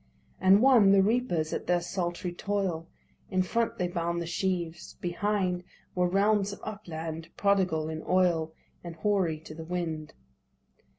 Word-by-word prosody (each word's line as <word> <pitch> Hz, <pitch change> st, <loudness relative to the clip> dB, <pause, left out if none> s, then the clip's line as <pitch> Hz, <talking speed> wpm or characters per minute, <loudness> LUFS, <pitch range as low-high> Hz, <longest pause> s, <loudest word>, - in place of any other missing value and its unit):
And 190 Hz, +4 st, +6 dB
one, 230 Hz, -7 st, +7 dB
the 195 Hz, -1 st, +6 dB
reapers 200 Hz, -8 st, +1 dB
at -, -, -4 dB
their 180 Hz, 0 st, +3 dB
sultry 175 Hz, 0 st, -3 dB
toil. 185 Hz, -4 st, -2 dB, 0.4 s
In 185 Hz, -1 st, +2 dB
front 230 Hz, +5 st, -1 dB
they 180 Hz, -, 0 dB
bound 170 Hz, -1 st, -2 dB
the 170 Hz, -, -3 dB
sheaves. 175 Hz, -1 st, -3 dB
Behind 180 Hz, 0 st, -1 dB, 0.3 s
Were 180 Hz, -1 st, +2 dB
realms 200 Hz, +1 st, +2 dB
of 200 Hz, -, -8 dB
upland, 165 Hz, -6 st, -6 dB
prodigal 185 Hz, -6 st, +2 dB
in 160 Hz, 0 st, -4 dB
oil, 175 Hz, -3 st, +2 dB, 0.3 s
And 170 Hz, -1 st, -7 dB
hoary 180 Hz, -3 st, +1 dB
to 160 Hz, -, -10 dB
the 160 Hz, +1 st, -8 dB
wind. 160 Hz, -3 st, -4 dB
180 Hz, 150 wpm, -29 LUFS, 165-200 Hz, 0.4 s, one